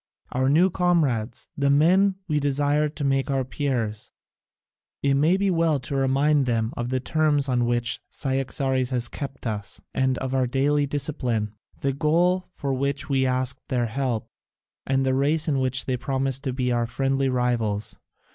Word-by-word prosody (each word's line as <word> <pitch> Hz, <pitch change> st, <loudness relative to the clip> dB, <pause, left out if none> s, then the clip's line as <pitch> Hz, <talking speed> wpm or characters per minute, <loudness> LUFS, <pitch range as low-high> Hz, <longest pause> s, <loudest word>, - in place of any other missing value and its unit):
Our 130 Hz, +1 st, +1 dB
new 175 Hz, +6 st, +4 dB
comrades, 155 Hz, -11 st, 0 dB
the 140 Hz, 0 st, +1 dB
men 185 Hz, +7 st, +4 dB
we 150 Hz, -3 st, +1 dB
desire 145 Hz, +1 st, +1 dB
to 150 Hz, 0 st, -6 dB
make 135 Hz, 0 st, +1 dB
our 135 Hz, -2 st, 0 dB
peers 120 Hz, -6 st, -2 dB, 0.9 s
it 140 Hz, -1 st, +3 dB
may 155 Hz, +7 st, +3 dB
be 195 Hz, 0 st, +1 dB
well 165 Hz, -4 st, +2 dB
to 140 Hz, -, -5 dB
remind 135 Hz, +1 st, +2 dB
them 115 Hz, -1 st, 0 dB
of 120 Hz, 0 st, -3 dB
the 130 Hz, 0 st, 0 dB
terms 145 Hz, +1 st, +1 dB
on 125 Hz, -2 st, +1 dB
which 120 Hz, 0 st, -1 dB
Cyaxares 130 Hz, -1 st, -1 dB
has 125 Hz, -2 st, 0 dB
kept 135 Hz, 0 st, -7 dB
us 105 Hz, -3 st, -3 dB
and 130 Hz, -1 st, +1 dB
of 130 Hz, 0 st, -3 dB
our 130 Hz, -1 st, +2 dB
daily 145 Hz, +3 st, +1 dB
discipline, 125 Hz, -7 st, -1 dB, 0.3 s
the 135 Hz, 0 st, 0 dB
goal 175 Hz, +6 st, +2 dB
for 140 Hz, -5 st, -3 dB
which 140 Hz, +3 st, -2 dB
we 135 Hz, -1 st, +2 dB
asked 130 Hz, 0 st, 0 dB
their 125 Hz, -2 st, 0 dB
help, 120 Hz, -1 st, -2 dB, 0.6 s
and 135 Hz, 0 st, +1 dB
the 130 Hz, -, +2 dB
race 150 Hz, +4 st, +1 dB
in 140 Hz, -3 st, +1 dB
which 130 Hz, 0 st, 0 dB
they 130 Hz, -1 st, -1 dB
promised 135 Hz, +1 st, -1 dB
to 130 Hz, -, 0 dB
be 125 Hz, -1 st, -1 dB
our 120 Hz, -1 st, +1 dB
friendly 135 Hz, +3 st, 0 dB
rivals. 115 Hz, -4 st, -1 dB
135 Hz, 170 wpm, -24 LUFS, 125-145 Hz, 0.9 s, new